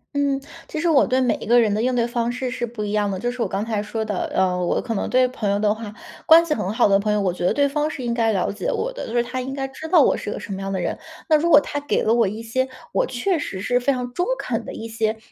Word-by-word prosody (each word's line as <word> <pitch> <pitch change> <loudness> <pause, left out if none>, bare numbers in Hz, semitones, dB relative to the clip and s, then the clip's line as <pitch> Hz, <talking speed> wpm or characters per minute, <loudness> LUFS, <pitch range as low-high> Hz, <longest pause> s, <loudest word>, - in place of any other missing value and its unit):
嗯， 280 -1 +1 0.3
其 310 - -4
实 340 - 0
我 290 -4 +4
对 255 +1 +2
每 250 -2 +2
一 - - -8
个 240 +1 +6
人 215 -3 +2
的 215 - 0
应 250 +1 +1
对 235 - +2
方 235 0 -1
式 250 0 -3
是 240 -1 -3
不 220 -2 -6
一 205 - -3
样 210 -1 +1
的， 190 - -2
就 240 +6 -2
是 250 - -6
我 225 - +1
刚 195 +3 -2
才 220 -3 -1
说 220 +1 -3
的， 205 -4 -2
呃， 180 -1 +1
我 175 - +1
可 230 - -3
能 205 - -2
对 255 0 +4
朋 220 -5 -3
友 200 - +2
的 210 0 +2
话 220 -1 -7 0.4
关 330 +1 +8
系 310 - 0
很 210 -7 -2
好 220 - +3
的 195 0 +4
朋 210 +1 0
友， 210 - +2
我 185 -3 0
觉 180 - -6
得 - - +3
对 285 +6 +2
方 295 +2 -1
是 270 - -6
应 235 -1 -1
该 230 -1 +2
了 190 -3 0
解 205 - -5
我 - - -2
的， - - -6
就 225 - -5
是 240 - +3
他 255 +1 -4
应 265 +2 -5
该 270 -1 -2
知 315 +4 -8
道 330 -3 +6
我 - - +3
是 - - -5
一 - - -2
个 - - -6
什 200 - -6
么 195 - -5
样 195 0 -3
的 190 - -1
人。 175 - -3 0.3
那 310 - +6
如 335 +3 +2
果 300 - +9
他 290 - -4
给 290 0 0
了 220 - +3
我 230 -3 +3
一 215 +4 -5
些， 260 +3 -1 0.2
我 - - +1
确 315 +8 -1
实 190 -9 -5
是 245 +5 +1
非 250 +3 +1
常 250 -2 -3
中 355 - 0
肯 - - -3
的 - - -7
一 225 - -6
些 220 -1 -1
235 Hz, 355 characters per minute, -22 LUFS, 210-265 Hz, 0.4 s, 果